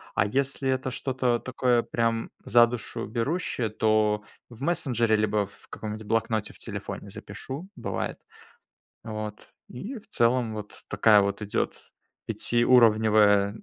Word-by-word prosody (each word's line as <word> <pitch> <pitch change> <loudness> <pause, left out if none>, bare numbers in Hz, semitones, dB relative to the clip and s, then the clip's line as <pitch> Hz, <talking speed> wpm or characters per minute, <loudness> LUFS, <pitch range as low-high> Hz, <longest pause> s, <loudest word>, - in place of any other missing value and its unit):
а - - +3
если 135 +4 0
это 130 0 0
что-то 125 -2 0
такое, 125 -1 +1
прям 115 -1 -1
за 120 +2 +6
душу 120 -2 -5
берущее, 120 - -1
то 110 -1 +2 0.3
в 120 +1 -14
мессенджере, 125 -9 +1
либо 105 -1 +1
в 100 - -18
каком-нибудь 110 0 -6
блокноте 115 -1 0
в - - -16
телефоне - - -6
запишу, 145 +8 -7
бывает. - - -4 0.8
Вот. 110 -2 -6 0.2
И, 215 - -7
в 220 - -23
целом, 120 - +1
вот 105 -1 -7
такая 105 0 +5
вот 100 +1 -1
идет 105 -1 -3 0.3
пятиуровневая 110 -4 +4
115 Hz, 130 wpm, -27 LUFS, 105-125 Hz, 0.8 s, за